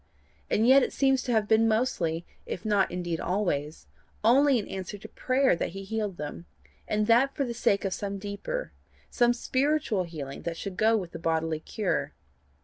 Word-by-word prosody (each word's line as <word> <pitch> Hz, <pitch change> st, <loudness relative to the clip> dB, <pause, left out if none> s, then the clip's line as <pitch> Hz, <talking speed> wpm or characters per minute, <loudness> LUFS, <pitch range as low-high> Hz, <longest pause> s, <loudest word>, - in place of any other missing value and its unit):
and 220 Hz, +2 st, +2 dB
yet 270 Hz, +2 st, +7 dB
it -, -, 0 dB
seems 270 Hz, -1 st, +2 dB
to 250 Hz, -, -3 dB
have 220 Hz, -3 st, +2 dB
been 225 Hz, +1 st, +4 dB
mostly, 175 Hz, -8 st, 0 dB, 0.2 s
if 180 Hz, -, -5 dB
not 205 Hz, -2 st, +2 dB
indeed 175 Hz, -2 st, -3 dB
always, 165 Hz, -6 st, -2 dB, 0.4 s
only 265 Hz, +4 st, +5 dB
in 210 Hz, -, -3 dB
answer 190 Hz, +2 st, -6 dB
to 200 Hz, -, -10 dB
prayer 260 Hz, -4 st, +2 dB
that 170 Hz, -, -3 dB
he 195 Hz, 0 st, -6 dB
healed 210 Hz, -2 st, -3 dB
them, 150 Hz, +3 st, -7 dB, 0.4 s
and 215 Hz, 0 st, +1 dB
that 240 Hz, +5 st, +4 dB
for 275 Hz, -, 0 dB
the 240 Hz, -, -4 dB
sake 200 Hz, -3 st, +1 dB
of 190 Hz, -, -1 dB
some 200 Hz, 0 st, -4 dB
deeper, 205 Hz, -, -5 dB, 0.4 s
some 240 Hz, -1 st, +3 dB
spiritual 260 Hz, -, 0 dB
healing 145 Hz, -5 st, -7 dB
that 170 Hz, -1 st, -4 dB
should 195 Hz, 0 st, -5 dB
go 220 Hz, +4 st, +3 dB
with 180 Hz, -5 st, -5 dB
the 170 Hz, -, -7 dB
bodily 160 Hz, -1 st, 0 dB
cure. 205 Hz, +4 st, -2 dB
205 Hz, 185 wpm, -28 LUFS, 175-240 Hz, 0.4 s, yet